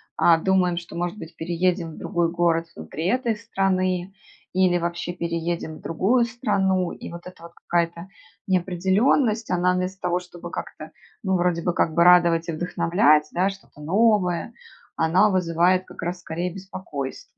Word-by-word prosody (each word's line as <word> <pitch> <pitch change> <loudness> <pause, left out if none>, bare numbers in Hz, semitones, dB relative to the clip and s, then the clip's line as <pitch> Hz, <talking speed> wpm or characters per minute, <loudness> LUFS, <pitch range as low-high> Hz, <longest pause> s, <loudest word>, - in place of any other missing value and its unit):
а, 165 -1 +5
думаем, 180 0 +1
что, 170 0 -7
может 175 +3 -3
быть, 165 -3 -10
переедем 170 +1 -1
в - - -12
другой 170 -1 -1
город 170 -1 +1
внутри 160 +5 -5
этой 240 +1 +1
страны. 190 -4 -1 0.4
Или 185 -1 +3
вообще 170 0 -3
переедем 170 -1 -3
в - - -16
другую 220 +9 +2
страну. 200 -7 0
И - - -9
вот 170 0 -9
эта 180 -2 -13
вот 170 - -11
какая-то 170 +1 -2 0.4
неопределенность, 190 +6 +1
она 180 0 +2
вместо 185 +1 -3
того, 180 -1 0
чтобы 175 -1 -10
как-то, - - -7 0.3
ну, 190 -2 +1
вроде 175 -1 +1
бы, 175 +1 0
как 160 -2 +1
бы 170 - +4
радовать 170 -2 +5
и 165 - -2
вдохновлять, 170 -2 +2
да, 185 +3 +2
что-то 195 -6 -12
новое, 190 +1 +2 0.4
она 175 +6 +3
вызывает 180 0 +2
как - - -11
раз 175 +1 -3
скорее 175 +1 -4
беспокойство. 185 -8 -6
175 Hz, 160 wpm, -24 LUFS, 170-190 Hz, 0.4 s, а